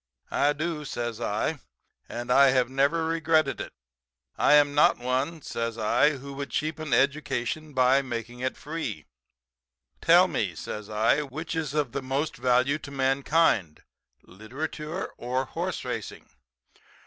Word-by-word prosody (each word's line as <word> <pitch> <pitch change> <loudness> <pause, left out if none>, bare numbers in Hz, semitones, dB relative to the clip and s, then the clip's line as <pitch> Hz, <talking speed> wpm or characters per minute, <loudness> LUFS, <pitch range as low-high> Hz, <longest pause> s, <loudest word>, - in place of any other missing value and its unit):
"'I 145 +1 +2
do,' 155 +1 -3
says 120 -4 -4
I, 120 +8 -1 0.5
'and 120 +1 -4
I 140 +2 +7
have 130 -1 +2
never 140 +5 +2
regretted 160 -2 +1
it. - - -7 0.6
I - - +4
am 145 -1 +5
not 145 - +5
one,' 130 +6 -2
says 115 -1 -3
I, 125 +8 +3
'who 140 +1 -9
would 140 0 -5
cheapen 155 0 -3
education 140 +2 0
by 130 +1 +4
making 120 -2 -6
it 130 +1 -2
free. 150 -8 -5 1.0
Tell - - +6
me,' - - -2
says 105 0 -6
I, 110 +7 +2
'which 155 +4 -5
is 155 -2 -3
of 145 -5 0
the 140 - -3
most 135 +4 -2
value 130 +4 +2
to 145 - -9
mankind, 135 - +1 0.4
literature 150 - -6
or 125 +2 -1
horse - - -4
racing?' - - -5
140 Hz, 140 wpm, -27 LUFS, 125-150 Hz, 1.0 s, I